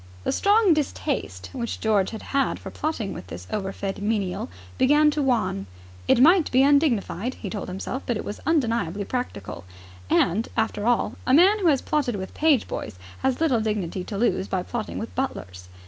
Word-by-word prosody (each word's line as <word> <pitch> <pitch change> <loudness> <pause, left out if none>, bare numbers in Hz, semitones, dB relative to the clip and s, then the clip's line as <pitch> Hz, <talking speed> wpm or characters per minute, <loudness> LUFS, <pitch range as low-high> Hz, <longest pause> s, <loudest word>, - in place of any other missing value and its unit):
The - - 0
strong 410 -2 +4
distaste 255 - -3
which 235 - -4
George 210 -4 +2
had 220 - -8
had 275 -1 +1
for - - -9
plotting 235 -11 -3
with 90 - -9
this 90 +1 -8
overfed 195 -1 -3
menial 205 - -1 0.3
began 295 +3 +5
to 295 - -1
wane. 230 - 0 0.4
It - - +4
might 330 +5 +6
be 260 +1 +4
undignified, 260 - +2
he 200 - -7
told 205 -3 -4
himself 195 +8 -4
but 240 - 0
it - - -6
was 205 - -6
undeniably 230 - 0
practical. 220 - -5 0.5
And, 200 +7 +2
after 220 -1 0
all, 240 -1 +1
a 255 - +5
man 385 +7 +6
who 370 - +1
has 280 -5 +3
plotted 280 -7 0
with 190 -1 -6
page 300 -6 +3
boys - - -6 0.2
has 265 -1 0
little 275 -8 +2
dignity 200 -4 -2
to 205 - -5
lose 210 -3 +1
by 185 -2 -1
plotting 235 +1 -4
with 225 - -5
butlers. 90 - -4
230 Hz, 180 wpm, -24 LUFS, 195-280 Hz, 0.5 s, might